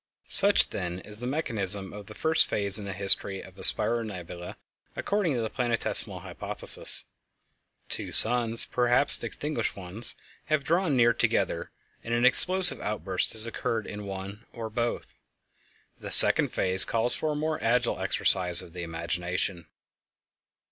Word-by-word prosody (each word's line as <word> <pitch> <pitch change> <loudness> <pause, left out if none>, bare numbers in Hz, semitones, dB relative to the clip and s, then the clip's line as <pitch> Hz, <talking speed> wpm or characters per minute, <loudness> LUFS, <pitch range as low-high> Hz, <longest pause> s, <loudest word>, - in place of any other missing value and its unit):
Such, - - +5
then, 90 0 -6
is 105 +2 -3
the 125 - -6
mechanism 105 - -1
of 105 -1 -12
the 110 - -13
first 160 +1 +2
phase 100 -1 -2
in 100 - -9
the 100 - -7
history 95 0 +4
of - - -14
a - - -10
spiral 120 0 +4
nebula 90 -4 -10 0.4
according 200 -8 -3
to 120 - -3
the 110 - -5
Planetesimal 120 -3 -2
Hypothesis. - - -1 0.8
Two - - -3
suns, 115 -1 +2
perhaps 125 +3 +2
extinguished 145 -6 -5
ones, 100 +5 -1 0.3
have 155 -2 -2
drawn 165 -2 -1
near 120 -1 +2
together, - - -3 0.3
and 115 0 -4
an 120 +1 0
explosive 180 +7 +6
outburst 100 -3 -3
has 110 0 +6
occured 115 -1 -5
in 105 -1 -9
one 100 +3 -9
or 115 -2 -8
both. 120 +1 -5 0.9
The - - -9
second - - +4
phase 95 0 0
calls 115 +1 -1
for 155 -1 -4
a - - -7
more 155 +1 -5
agile 120 +1 -1
exercise 90 -2 +3
of 85 - -15
the 90 - -8
imagination. 85 +1 -5
110 Hz, 150 wpm, -25 LUFS, 95-125 Hz, 0.9 s, explosive